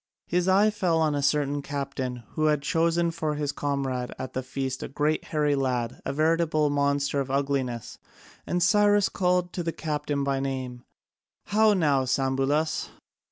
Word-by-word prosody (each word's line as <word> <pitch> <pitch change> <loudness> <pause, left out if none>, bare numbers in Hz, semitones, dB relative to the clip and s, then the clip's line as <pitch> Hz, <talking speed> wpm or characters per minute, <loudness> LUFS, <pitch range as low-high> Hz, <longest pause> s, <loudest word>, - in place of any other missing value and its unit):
His 180 +1 0
eye 200 +3 +4
fell 185 -5 +1
on 155 -2 +2
a 145 - -1
certain 145 0 +1
captain 135 -3 -4
who 155 - -1
had 150 -2 +2
chosen 165 +2 +1
for 155 -2 -2
his 145 -1 -1
comrade 135 -4 -2
at 130 - -6
the 130 - -2
feast 130 0 -4
a - - -4
great 150 +3 -1
hairy 150 -2 +1
lad, 125 -3 -1
a - - -2
veritable 155 0 +2
monster 140 0 +1
of 135 -1 -2
ugliness, 135 -4 -2 0.5
and 175 0 +1
Cyrus 205 +2 +4
called 180 -1 0
to 180 - -3
the 165 -1 -2
captain 150 -3 -2
by 140 -1 0
name: 130 -2 -4 0.6
"How 215 +1 +4
now, 145 -7 +2
Sambulas? 135 +4 0
145 Hz, 160 wpm, -26 LUFS, 135-165 Hz, 0.6 s, eye